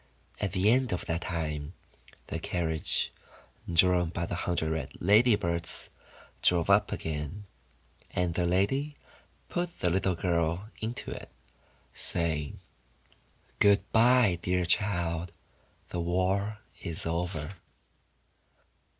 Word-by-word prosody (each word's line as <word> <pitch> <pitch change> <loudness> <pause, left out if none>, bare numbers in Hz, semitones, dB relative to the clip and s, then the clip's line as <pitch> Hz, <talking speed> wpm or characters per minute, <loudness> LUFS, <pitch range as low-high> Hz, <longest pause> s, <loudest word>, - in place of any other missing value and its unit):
At 100 - -2
the 100 +3 +4
end 125 0 +2
of 90 - -3
that 85 +1 -1
time, 75 -3 -3 0.5
the - - -4
carriage 80 -3 0 0.6
drawn 90 0 +4
by 85 0 -2
the - - -5
hundred 85 -2 -1
red 80 -5 -3
Ladybirds, 100 -5 +2 0.5
drove 90 +1 +3
up 105 +1 +4
again, 80 +6 -4 0.6
and 90 -1 0
the 85 0 +1
lady 135 +12 +1 0.5
put 175 -1 -3
the 90 - +1
little 95 0 +1
girl 85 +4 0
into 115 +2 -4
it, - - -7 0.6
saying: 80 -4 -2 0.5
— - - -34
'Good 100 0 +4
bye, 115 -5 +5
dear 90 0 +1
child, 85 -2 +1 0.6
the 90 - -3
war 95 +5 0 0.2
is 85 -2 -4
over." 85 +1 -3
90 Hz, 115 wpm, -29 LUFS, 85-100 Hz, 0.6 s, bye